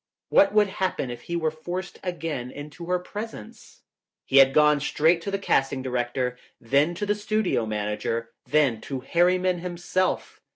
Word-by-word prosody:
What 290 0 +5
would 210 -1 +5 0.2
happen 180 -9 -1
if 120 - -7
he 170 - -5
were 160 -2 0
forced 175 +4 -6
again 165 -8 -4
into 145 +5 -9
her 180 0 +2
presence? 205 - -9 0.4
He 135 - +2
had 135 -1 +8
gone 150 +1 +5
straight 160 +4 +2
to 200 - -4
the 195 - -1
casting 135 -8 0
director, 125 0 -2 0.2
then 140 +8 +2
to 205 - -3
the 205 - +2
studio 210 - 0
manager, 105 +2 -2 0.2
then 140 -7 +2
to 135 -2 -5
Harriman 180 +4 +2
himself. 180 +1 -2
155 Hz, 160 wpm, -25 LUFS, 130-180 Hz, 0.4 s, had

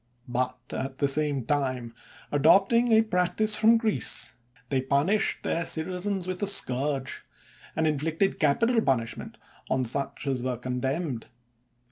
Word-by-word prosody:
But 125 +1 -1
at 130 0 -4
the 140 - +1
same 140 -3 0
time, 130 -4 -1 0.4
adopting 195 - +4
a 220 0 +6
practise 215 +2 +2
from 225 +2 +5
Greece, 225 -2 0 0.4
they 135 -2 +1
punished 145 +10 +1
their 170 - -1
citi 160 +2 -3
zens 190 0 -2
with 185 0 -4
the 205 - -1
scourge, 140 -6 0 0.5
and 160 - +1
inflicted 160 +5 0
capital 225 - +3
pun 135 - +2
ishment 115 - -8 0.3
on 130 -1 +1
such 140 +5 -3
as 135 -3 -1
were 125 -1 -2
condemned. 130 +2 -3
150 Hz, 140 wpm, -27 LUFS, 130-195 Hz, 0.5 s, a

